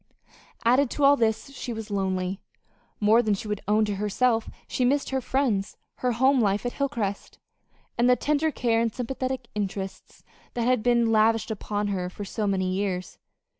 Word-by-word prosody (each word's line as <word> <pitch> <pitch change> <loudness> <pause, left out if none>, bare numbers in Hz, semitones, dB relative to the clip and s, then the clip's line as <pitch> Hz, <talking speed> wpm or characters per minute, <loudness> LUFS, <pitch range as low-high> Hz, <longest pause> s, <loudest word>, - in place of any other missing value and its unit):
Added 255 +3 +4
to 290 - -2
all 280 +1 +7
this, 225 0 0
she 260 -2 -6
was 225 -2 -6
lonely. 190 -1 -1 0.6
More 220 +3 +5
than 215 -3 +1
she 205 - -7
would 210 -1 -3
own 215 +1 +3
to 205 -2 -3
herself 225 +3 +1 0.2
she 255 - -1
missed 275 +3 +1
her 265 0 0
friends, 240 -7 0 0.2
her 250 -1 0
home 260 +3 +3
life 205 +1 +1
at 245 - -2
Hilcrest, 235 -8 -3 0.6
and 245 +1 +4
the 250 - +6
tender 300 +4 +1
care 230 -6 +1
and 230 -1 +1
sympathetic 255 +1 -3
interest 195 -2 -5 0.3
that 235 -1 0
had 250 -2 +2
been 235 -1 +3
lavished 225 +1 +3
upon 205 -1 -2
her 180 -2 -2
for 205 +3 -7
so 210 +2 -2
many 185 -2 0
years. 185 -2 -3
225 Hz, 175 wpm, -26 LUFS, 205-250 Hz, 0.6 s, all